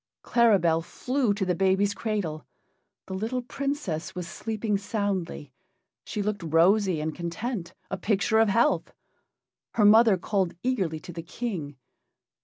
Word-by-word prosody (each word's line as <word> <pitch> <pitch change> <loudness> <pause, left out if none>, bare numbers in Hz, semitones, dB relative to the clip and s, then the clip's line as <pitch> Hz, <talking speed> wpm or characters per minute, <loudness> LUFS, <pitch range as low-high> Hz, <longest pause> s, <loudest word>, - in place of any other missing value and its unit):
Claribel 190 -9 +3
flew 250 +7 -1
to 200 -1 -1
the 180 - +1
baby's 195 +3 +2
cradle. 200 -8 -3 0.6
The 190 - -7
little 225 +6 -2
Princess 250 - -3
was 180 -2 -4
sleeping 215 +1 -2
soundly; 195 - -3 0.5
she 210 - -3
looked 205 -1 -2
rosy 175 +3 +3
and 155 +1 -2
content 175 - -4 0.2
a 195 - -1
picture 205 +3 +1
of 225 -1 +4
health. 235 +8 +2 0.8
Her 210 - +4
mother 220 -1 +7
called 185 -1 -1
eagerly 190 -11 0
to 175 0 -9
the 165 - -5
King. 170 - -5
195 Hz, 135 wpm, -27 LUFS, 170-220 Hz, 0.8 s, mother